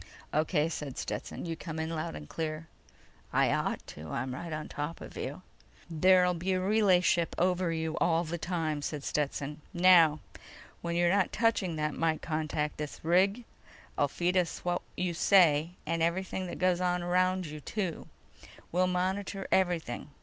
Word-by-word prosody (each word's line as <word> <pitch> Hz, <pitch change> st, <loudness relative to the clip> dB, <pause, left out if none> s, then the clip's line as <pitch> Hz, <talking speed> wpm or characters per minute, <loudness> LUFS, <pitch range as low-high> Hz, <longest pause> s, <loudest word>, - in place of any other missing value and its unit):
"O.K.," 155 Hz, 0 st, +2 dB
said 150 Hz, -5 st, -5 dB
Stetson. -, -, -4 dB
"You 165 Hz, -1 st, -3 dB
come 160 Hz, -1 st, -7 dB
in 160 Hz, +1 st, -2 dB
loud 155 Hz, -, -3 dB
and 75 Hz, 0 st, -8 dB
clear." 155 Hz, -, -4 dB, 0.7 s
"I -, -, +3 dB
ought -, -, -1 dB
to. 75 Hz, +1 st, -9 dB
I'm 125 Hz, +7 st, -3 dB
right 170 Hz, +5 st, -6 dB
on 155 Hz, 0 st, -4 dB
top 150 Hz, +3 st, -5 dB
of -, -, -10 dB
you!" -, -, -5 dB, 0.5 s
"There'll 180 Hz, +2 st, +5 dB
be 180 Hz, +2 st, -1 dB
a 185 Hz, -, +1 dB
relay 195 Hz, -1 st, +4 dB
ship 170 Hz, -1 st, +1 dB
over 180 Hz, -1 st, +1 dB
you 160 Hz, -1 st, -2 dB
all 165 Hz, 0 st, +2 dB
the 170 Hz, +1 st, -4 dB
time," 160 Hz, -3 st, -2 dB
said 145 Hz, -1 st, -4 dB
Stetson. 145 Hz, 0 st, -2 dB
"Now... 170 Hz, -4 st, +6 dB, 0.6 s
when 170 Hz, 0 st, -2 dB
you're 175 Hz, +1 st, +3 dB
not 200 Hz, -3 st, +2 dB
touching 215 Hz, -6 st, +1 dB
that 150 Hz, -1 st, -1 dB
mike 160 Hz, -1 st, 0 dB
contact 155 Hz, -1 st, -2 dB
this 150 Hz, -1 st, -5 dB
rig'll 190 Hz, +8 st, +3 dB, 0.5 s
still 145 Hz, -, +2 dB
feed 175 Hz, +5 st, 0 dB
us 175 Hz, -1 st, -1 dB
what 175 Hz, 0 st, 0 dB, 0.2 s
you 180 Hz, -1 st, -1 dB
say... 165 Hz, -3 st, +4 dB
and 165 Hz, +1 st, -1 dB
everything 185 Hz, +2 st, -1 dB
that -, -, -6 dB
goes 185 Hz, -1 st, +2 dB
on 180 Hz, -1 st, +1 dB
around 185 Hz, +1 st, +2 dB
you, 155 Hz, 0 st, -7 dB
too. 185 Hz, +2 st, -4 dB, 0.6 s
We'll 185 Hz, +2 st, +2 dB
monitor 190 Hz, +2 st, -2 dB
everything. 175 Hz, -8 st, 0 dB
170 Hz, 170 wpm, -30 LUFS, 155-185 Hz, 0.7 s, Now